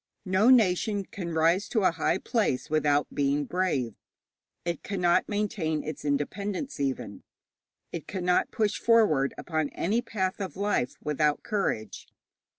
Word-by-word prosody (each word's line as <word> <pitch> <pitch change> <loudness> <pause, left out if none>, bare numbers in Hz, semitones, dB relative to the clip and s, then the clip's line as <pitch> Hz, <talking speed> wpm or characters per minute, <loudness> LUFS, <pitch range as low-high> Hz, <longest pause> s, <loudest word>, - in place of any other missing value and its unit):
No 190 +5 +3
nation 205 -3 +3
can 175 -3 -6
rise 165 +5 +2
to 220 - +1
a 185 - +5
high 165 +2 0
place 190 - -1
without 150 -2 +2
being 145 +1 +1
brave; 145 - -1 0.7
it 170 -3 -2
cannot 180 -3 +1
maintain 205 -7 -1
its 155 -1 -6
independence 185 - -2
even; 130 -8 -3 0.7
it 165 - -6
cannot 180 -2 +1
push 215 -2 0
forward 210 -13 +3
upon 155 -4 -2
any 215 +7 0
path 190 -4 -2
of 190 - -5
life 200 -11 0
without 150 0 +1
courage. 110 - -2
175 Hz, 135 wpm, -28 LUFS, 150-205 Hz, 0.7 s, a